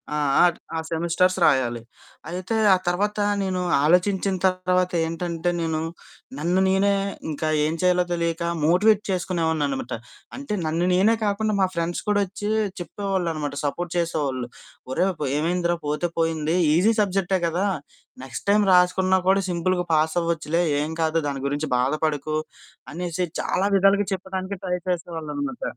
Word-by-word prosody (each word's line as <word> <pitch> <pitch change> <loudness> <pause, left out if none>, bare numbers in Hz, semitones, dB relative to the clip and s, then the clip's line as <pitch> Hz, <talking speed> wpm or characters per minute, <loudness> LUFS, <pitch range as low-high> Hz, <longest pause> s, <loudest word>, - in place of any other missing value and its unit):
ఆ! 150 - -2 0.6
ఆ - - -1
సెమిస్టర్స్ 170 +3 +1
రాయాలి. 125 -6 +2 0.5
అయితే 185 +5 -3 0.2
ఆ - - +6
తర్వాత 205 +4 0 0.2
నేను 185 -2 -1 0.2
ఆలోచించిన 190 +4 +2
తర్వాత 185 0 +1
ఏంటంటే, 165 +1 -2
నేను 160 -1 -1 0.6
నన్ను 175 +5 +1
నేనే 195 +1 +3 0.4
ఇంకా 155 +1 -3 0.2
ఏం 155 - 0
చేయాలో 180 0 +3
తెలియక 170 0 -1 0.2
మోటివేట్ 200 +6 +4
చేసుకునేవాడిని 170 -4 0
అనమాట. 135 -3 -4 0.4
అంటే 275 -4 -5
నన్ను 165 +3 0
నేనే 200 +5 +4
కాకుండా 210 +1 0
మా 190 - +4
ఫ్రెండ్స్ 170 +1 -2
కూడా 205 -1 +3
వచ్చి 205 +2 -5 0.3
చెప్పేవాళ్ళు 190 +1 -2
అనమాట, 145 -2 -4
సపోర్ట్ 170 +4 -3
చేసేవాళ్ళు. 145 -7 -1 0.4
"ఒరేయ్! 185 +8 +2 0.3
ఏమైందిరా? 175 +2 0
పోతే 150 +4 -1
పోయింది. 165 0 0 0.2
ఈజీ 200 +7 +4
సబ్జెక్టే 195 -1 0
కదా! 175 +4 0 0.6
నెక్స్ట్ 130 -3 -7
టైం 210 +1 +5
రాసుకున్నా 185 +1 +4
కూడా 195 +1 +4
సింపుల్‌గా 180 +1 0
పాస్ 155 +2 +2
అవ్వచ్చులే. 165 0 0 0.2
ఏం 150 +2 -3
కాదు. 160 0 +1
దాని 140 -1 -3
గురించి 145 +2 -2
బాధపడకు" 150 +3 0 0.6
అనేసి 175 +1 -2 0.2
చాలా 190 +2 0
విధాలుగా 195 +1 +3
చెప్పడానికి 190 +1 -4
ట్రై 180 -1 0
చేసేవాళ్ళు 165 -3 -3
అనమాట. 275 -3 -4
175 Hz, 135 wpm, -24 LUFS, 160-190 Hz, 0.6 s, ఆ